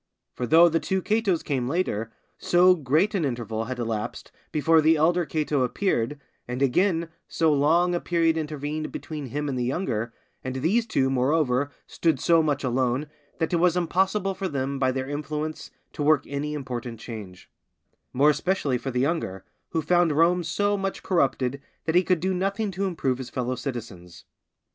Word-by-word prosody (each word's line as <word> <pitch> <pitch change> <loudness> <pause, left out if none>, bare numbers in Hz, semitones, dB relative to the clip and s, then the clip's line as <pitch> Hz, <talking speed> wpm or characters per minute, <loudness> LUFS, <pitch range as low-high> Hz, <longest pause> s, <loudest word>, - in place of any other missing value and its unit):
For 125 - -3
though 165 +7 +7
the 165 0 +1
two 190 +3 -1
Catos 210 -5 +1
came 130 -4 -1
later, 120 - -1 0.3
so 180 +1 +5
great 160 - +1
an 190 -5 0
interval 115 -4 -2
had 130 +1 -5
elapsed 115 -3 -4 0.2
before 160 +1 +4
the 160 +1 +5
elder 170 +2 +2
Cato 150 -3 0
appeared, 130 - 0 0.3
and 125 +2 -2
again, 170 +5 +2 0.2
so 160 -2 +2
long 165 +5 +3
a 175 - +1
period 165 -2 +1
intervened 155 0 -3
between 150 -3 -6
him 145 +4 -3
and 130 -3 -2
the - - 0
younger, 120 - -2 0.3
and 130 0 -4
these 195 - +1
two, 135 -10 +1
moreover, 135 0 +1 0.2
stood 160 -5 0
so 165 +3 +4
much 145 -2 0
alone, 130 +3 0 0.3
that 160 +1 -1
it - - +4
was 175 +1 +3
impossible 190 +3 +1
for 190 0 -3
them, 140 -3 -2
by 130 -1 +2
their 130 0 -3
influence, 150 +2 -4 0.2
to - - -6
work 150 0 +3
any 145 +2 -3
important 125 -4 -5
change; 105 -6 -9 0.6
more 145 +4 +4
especially 150 -6 0
for 135 - -4
the 125 -1 -1
younger, 135 - -2 0.2
who 160 - -1
found 175 0 +3
Rome 170 +3 +3
so 205 +4 0
much 195 -1 -3
corrupted 140 -6 0 0.2
that 160 - 0
he 180 - +6
could 180 0 +1
do 190 +3 0
nothing 195 +3 -1
to 195 +2 -2
improve 135 -9 -1
his 130 - -6
fellow 125 0 -2
citizens. 115 -9 -7
150 Hz, 175 wpm, -25 LUFS, 130-175 Hz, 0.6 s, though